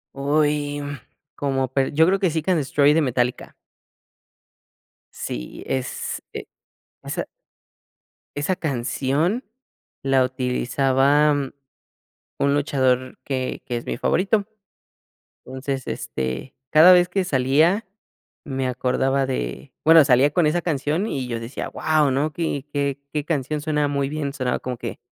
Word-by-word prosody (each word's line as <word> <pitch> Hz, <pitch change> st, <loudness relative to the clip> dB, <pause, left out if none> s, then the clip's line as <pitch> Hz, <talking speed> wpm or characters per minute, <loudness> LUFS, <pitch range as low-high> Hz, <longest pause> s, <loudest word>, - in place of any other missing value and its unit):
Uy, 145 Hz, +1 st, 0 dB
mm, 145 Hz, 0 st, -5 dB, 0.4 s
como 135 Hz, -2 st, -1 dB
pe 135 Hz, +1 st, 0 dB
yo 160 Hz, +2 st, +5 dB
creo 190 Hz, +3 st, +2 dB
que 190 Hz, -3 st, +2 dB
Seek 160 Hz, +2 st, -2 dB
and 180 Hz, -, +3 dB
Destroy 145 Hz, +1 st, +3 dB
de 160 Hz, -, +3 dB
Metallica. 125 Hz, -3 st, -1 dB, 1.6 s
Sí, -, -, -6 dB
es 130 Hz, -1 st, -3 dB
e -, -, -6 dB, 0.6 s
esa -, -, -4 dB, 1.1 s
esa 145 Hz, +6 st, 0 dB
canción 145 Hz, -, -1 dB, 0.6 s
la 135 Hz, -1 st, +3 dB
utilizaba, 135 Hz, +3 st, +2 dB
mm, 140 Hz, -2 st, -2 dB, 0.9 s
un 140 Hz, 0 st, +2 dB
luchador 130 Hz, -3 st, +1 dB
que 130 Hz, -2 st, -3 dB
que 125 Hz, -3 st, -2 dB
es 120 Hz, -, -10 dB
mi -, -, -2 dB
favorito. 200 Hz, +2 st, +1 dB, 1.0 s
Entonces, 130 Hz, 0 st, -4 dB
este, 65 Hz, -, -4 dB, 0.2 s
cada 160 Hz, +4 st, +8 dB
vez 175 Hz, -1 st, +5 dB
que 190 Hz, +2 st, 0 dB
salía 155 Hz, -, +2 dB, 0.6 s
me 135 Hz, -2 st, -2 dB
acordaba 130 Hz, +2 st, 0 dB
de, -, -, -4 dB
bueno, 160 Hz, -1 st, +8 dB
salía 135 Hz, +1 st, +4 dB
con 170 Hz, 0 st, +3 dB
esa 165 Hz, +3 st, +2 dB
canción 155 Hz, +4 st, -1 dB
y 135 Hz, -, -3 dB
yo 120 Hz, -1 st, -2 dB
decía: 115 Hz, +4 st, -5 dB
"Guau, 155 Hz, -3 st, +1 dB
¿no?, 150 Hz, +3 st, 0 dB
qué 155 Hz, -5 st, -3 dB
qué 140 Hz, -1 st, -1 dB
qué 150 Hz, -2 st, -2 dB
canción", 150 Hz, -1 st, -2 dB
sonaba 150 Hz, 0 st, 0 dB
muy 140 Hz, -1 st, -1 dB
bien, 145 Hz, -1 st, -3 dB
sonaba 130 Hz, -4 st, -1 dB
como 125 Hz, -1 st, -4 dB
que, -, -, -6 dB
140 Hz, 135 wpm, -23 LUFS, 130-155 Hz, 1.6 s, cada